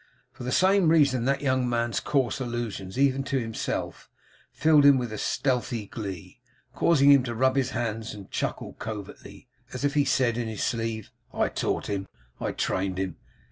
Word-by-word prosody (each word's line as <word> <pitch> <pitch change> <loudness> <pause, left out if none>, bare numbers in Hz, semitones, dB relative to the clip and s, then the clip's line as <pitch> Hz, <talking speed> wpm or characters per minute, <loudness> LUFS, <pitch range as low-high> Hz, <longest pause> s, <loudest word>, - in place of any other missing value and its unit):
For - - -10
the 125 - -3
same 190 0 +4
reason 140 -7 +3
that 140 +1 0
young 130 -2 +1
man's 120 -1 0
coarse 135 -3 0
allusions, 120 -5 -4
even 135 0 +2
to 135 - -1
himself, 115 -2 -4 0.4
filled 155 -1 +4
him 140 -1 +7
with 120 -3 -3
a 105 - -5
stealthy 125 -5 -1
glee; 95 -2 -7 0.3
causing 140 -3 +4
him 140 -2 +7
to 120 -2 -4
rub 130 +3 +2
his 135 -2 +1
hands 115 -2 -3
and 100 -2 -12
chuckle - - -3
covertly, 110 +2 -8 0.3
as 130 +2 -2
if 140 - +1
he 145 - +3
said 125 -3 +1
in 120 - -2
his 110 -2 -4
sleeve, 115 -3 -2 0.2
'I - - +1
taught - - -2
him. 100 -1 -3 0.3
I - - -2
trained 95 0 -1
him. 95 -3 -3
120 Hz, 180 wpm, -26 LUFS, 110-135 Hz, 0.4 s, him